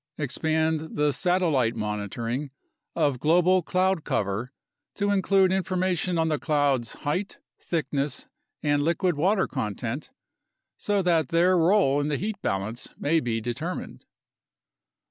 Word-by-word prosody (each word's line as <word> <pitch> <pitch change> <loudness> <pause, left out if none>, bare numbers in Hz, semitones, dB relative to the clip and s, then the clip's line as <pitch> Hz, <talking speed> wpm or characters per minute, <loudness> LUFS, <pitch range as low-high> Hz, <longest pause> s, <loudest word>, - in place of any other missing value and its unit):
Expand 160 +2 -1
the 150 -1 +2
satellite 160 -11 +1
monitoring 115 +5 -3 0.5
of 145 -6 +1
global 180 +5 +4
cloud 185 0 +1
cover 105 +5 -2 0.4
to 205 0 0
include 195 -1 +3
information 185 -2 0
on 160 0 +2
the 155 -2 0
clouds' 145 -6 +1
height, 180 +7 -2 0.2
thickness, 145 -4 -2 0.4
and 145 -1 +2
liquid 170 +3 +1
water 190 +7 +2
content, 120 - -4 0.7
so 205 -2 0
that 165 -6 +2
their 175 +2 +4
role 170 -5 +3
in 145 - -1
the 150 -2 0
heat 205 +3 -4
balance 100 +5 -3
may 165 +3 +2
be 115 -5 -1
determined. 135 +10 -5
155 Hz, 125 wpm, -26 LUFS, 130-180 Hz, 0.7 s, global